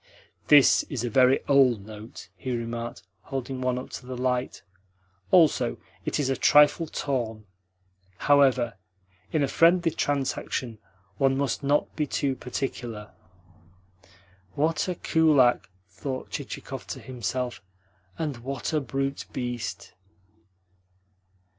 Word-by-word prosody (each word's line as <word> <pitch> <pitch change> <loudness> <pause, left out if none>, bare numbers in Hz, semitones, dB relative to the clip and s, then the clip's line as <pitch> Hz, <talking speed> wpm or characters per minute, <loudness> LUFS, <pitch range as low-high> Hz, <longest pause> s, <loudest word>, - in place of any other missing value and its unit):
"This 145 -3 +7
is 125 -5 -3
a 120 - -2
very 130 +2 +4
OLD 130 -7 +4
note," 110 -2 -10
he 125 +1 -3
remarked, 115 0 -5 0.2
holding 130 +1 -5
one 125 -1 0
up 125 - -7
to 125 - -8
the 130 -1 -5
light. 125 0 -1 0.7
"Also, 145 - +4 0.3
it - - -1
is 145 - +1
a 135 - +1
trifle 150 +5 +5
torn. 115 -8 -3 0.7
However, 130 -6 +3 0.5
in 155 -3 +1
a - - +2
friendly 170 +3 +4
transaction 135 -6 -2 0.4
one 135 -1 +3
must 140 -3 -1
not 145 +1 +1
be 150 -2 -1
too 135 -2 -1
particular." 120 -4 -5 1.4
"What 160 +5 +1
a 180 - -2
kulak!" 150 -10 +3 0.2
thought 130 +8 -6
Chichikov - - -6
to - - -5
himself. 125 0 -4 0.6
"And 150 -5 -3
what 130 +4 -4
a 155 - +2
brute 135 +1 -3
beast!" 120 -2 -5
130 Hz, 120 wpm, -26 LUFS, 120-145 Hz, 1.4 s, This